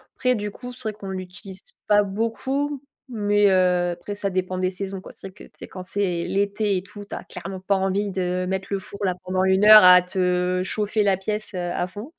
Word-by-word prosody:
Après 255 -1 +1
du 210 -2 -3
coup, 250 +4 -9
c'est 255 - -8
vrai - - -5
qu'on 200 -2 -9
l'utilise 190 +1 -7 0.3
pas 205 0 +5
beaucoup 260 +8 -2 0.3
mais 205 -3 +2
heu, 180 -1 +2
après 205 +4 -6
ça 200 -1 0
dépend 185 0 -2
des 185 0 0
saisons, 195 +1 -4
quoi. - - -12
C'est - - -8
vrai - - -19
que 210 - -14 0.2
c'est - - -8
quand 185 - -8
c'est 180 -2 -1
l'été 200 +1 0
et 180 - -4
tout, 205 +1 -11
tu - - -7
as - - -7
clairement 185 +1 -8
pas 200 +1 +1
envie 195 +2 0
de 180 -1 -1
mettre 190 0 -2
le 200 - 0
four 200 +1 -9
là, 185 - +1
pendant 185 0 0
1 190 +1 +3
heure 215 -1 +10
à 180 0 +9
te 180 0 0
chauffer 210 +2 0
la 200 -1 +3
pièce, 210 +3 -4
heu, 175 -1 -3
à 180 - -1
fond. 210 - -9
195 Hz, 230 wpm, -23 LUFS, 185-205 Hz, 0.3 s, heure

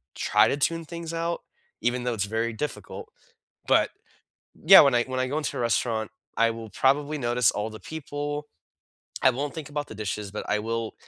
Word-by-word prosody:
try - - +4
to 140 - 0
tune 165 +3 0
things 170 0 -7
out, 170 +1 -2 0.4
even 120 +1 0
though 125 - 0
it's 100 - 0
very 115 +2 -1
difficult. 150 +6 -6 0.6
But, - - +4 0.8
yeah, 190 +4 +11
when 140 -3 +4
I 120 - +3
when 130 0 -4
I 130 - +1
go 145 - -1
into 155 - -3
a - - -1
restaurant, 110 -1 0 0.3
I 115 0 +4
will 115 -1 -8
probably 145 +6 +1
notice 120 -3 +2
all 105 +2 -3
the 110 - -10
people. 145 -1 -5 0.8
I 130 - +7
won't 140 +3 -3
think 155 -2 -6
about 145 0 -3
the - - -9
dishes, 105 -1 -4
but 105 - -5
I 105 - +2
will 115 0 -3
125 Hz, 195 wpm, -26 LUFS, 115-150 Hz, 0.8 s, yeah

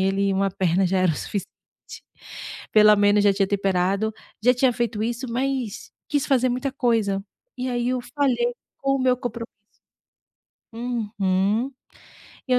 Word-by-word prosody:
ele 195 +1 +1
uma 195 +1 +1
perna 185 0 +1
já 190 +1 +1
era 185 -2 +3
o - - -4
suficiente, 200 +6 -4 1.3
pelo 210 -1 +7
menos 205 0 +4
já 200 - +5
tinha 195 -1 0
temperado, 195 +1 +1 0.3
já 250 +2 +5
tinha 250 0 +3
feito 235 -3 -2
isso, 240 +3 -2
mas 255 -3 -2 0.2
quis 290 -3 0
fazer 255 -2 +3
muita 255 +3 -1
coisa. 225 -7 +1 0.4
E 255 +1 -2
aí 240 -1 -1
eu 255 -1 0
falhei 245 -4 +1 0.3
com 275 0 +1
o - - -3
meu 255 -1 +3
compromisso. 235 -2 -5 1.3
Uhum. 220 -1 -1 0.8
E - - +1
eu - - +5
225 Hz, 155 wpm, -23 LUFS, 195-250 Hz, 1.3 s, pelo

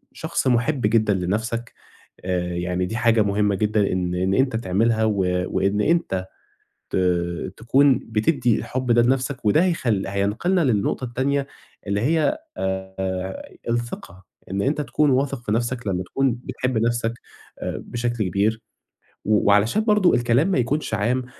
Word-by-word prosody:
شخص - - -2
مُحب 130 +3 +1
جدًا 110 -1 +3
لنَفْسك 110 +6 -2 0.5
آآ، 90 -1 -1
يعني 90 +1 -1
دي 110 +6 -4
حاجة 115 -2 +3
مهمة 105 0 +1
جدًا 105 0 +1
إن 90 -1 -1
إن 95 +2 0
أنت 130 +1 +2
تعملها 110 +2 +1
و 110 -1 +1 0.3
وإن 100 +2 0
أنت 100 - 0 0.6
ت - - 0 0.6
تكُون 135 +4 +3
بتدّي 115 +2 +1
الحب 125 +1 -2
ده 120 0 +5
لنَفْسك 130 +1 0
وده 105 - +4
هيخلّ 120 - 0
هينقْلنا 105 - 0
للنقطة 110 0 0
التانية 135 +3 -1 0.4
اللي 100 0 0
هي 160 - +2 0.2
آآ، 95 0 -4 0.2
الثقة، 120 -6 -4 0.3
إن 100 +1 -1
أنت 145 +6 0
تكُون 150 +1 +1
واثق 135 -1 0
في - - -2
نَفْسك 120 +1 -1
لمّا 90 -2 -1
تكُون 135 +5 0
بتحب 125 -2 -2
نَفْسك 115 0 0 0.5
بشكل 120 -2 -3
كبير 105 +4 0 0.7
و 105 0 +3
وعلشان 105 - +3
برضه 210 -5 +4
الكلام 120 +7 +2
ما 190 - +1
يكُونش 125 +1 -1
عام 120 +5 0
115 Hz, 145 wpm, -23 LUFS, 100-130 Hz, 0.7 s, ده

